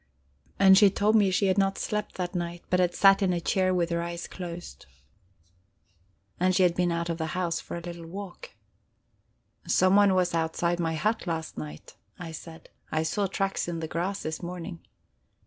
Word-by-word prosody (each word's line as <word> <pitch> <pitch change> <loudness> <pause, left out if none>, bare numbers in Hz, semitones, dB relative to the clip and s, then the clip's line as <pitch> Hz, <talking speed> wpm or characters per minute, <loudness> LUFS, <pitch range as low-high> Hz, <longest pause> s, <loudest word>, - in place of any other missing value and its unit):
And 190 0 +7
she 205 - +7
told 205 +3 +2
me 205 -3 +5
she 190 +2 +1
had 190 +1 +2
not 195 0 +1
slept 210 0 -3
that 180 0 -3
night, 175 -1 -4
but 180 - +3
had 180 -1 +2
sat 195 0 +6
in 185 -2 +2
a 175 - 0
chair 185 +2 +1
with 175 -2 0
her 170 0 0
eyes 170 0 -5
closed. 170 - -8 1.5
And 185 +1 +2
she 185 - +4
had 175 -2 +4
been 175 0 +1
out 170 0 -1
of 165 - -4
the 160 - -1
house 175 -2 0
for - - -7
a - - -6
little 170 -1 -8
walk. 200 - -8 1.2
"Someone 195 +1 +4
was 180 -1 +1
outside 170 +1 0
my 165 -1 0
hut 215 +6 -1
last 160 -2 -3
night," 75 0 -9 0.2
I 170 -2 -7
said. 160 0 -10 0.2
"I 155 0 +1
saw 200 +5 0
tracks 195 0 -2
in 170 -1 -3
the 160 - -4
grass 180 +5 -3
this 155 0 -4
morning." 175 0 -6
175 Hz, 190 wpm, -27 LUFS, 170-195 Hz, 1.5 s, And